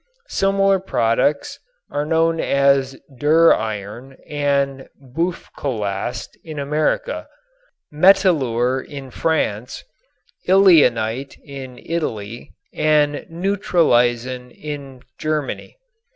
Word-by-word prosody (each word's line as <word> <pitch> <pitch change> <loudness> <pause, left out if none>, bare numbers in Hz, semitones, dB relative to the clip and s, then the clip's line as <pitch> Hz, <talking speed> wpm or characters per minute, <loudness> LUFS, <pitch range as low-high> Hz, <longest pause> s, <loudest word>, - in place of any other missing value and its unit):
Similar 195 0 +2
products 130 -2 0 0.3
are 145 +1 -2
known 165 0 +2
as 140 -2 +2 0.2
"duriron" 125 -6 +1
and 140 -2 -1
"Buflokast" 130 - -4
in 155 -2 -8
America, 155 - -1 0.7
"metilure" 140 - +3
in 135 -2 -9
France, 125 -6 -2 0.7
"ileanite" 135 - +4
in 135 -3 -9
Italy 120 -8 -4 0.2
and 150 -1 +1
"neutraleisen" 130 - +1
in 140 -4 -8 0.2
Germany. 155 - -3
140 Hz, 75 wpm, -20 LUFS, 125-165 Hz, 0.7 s, ileanite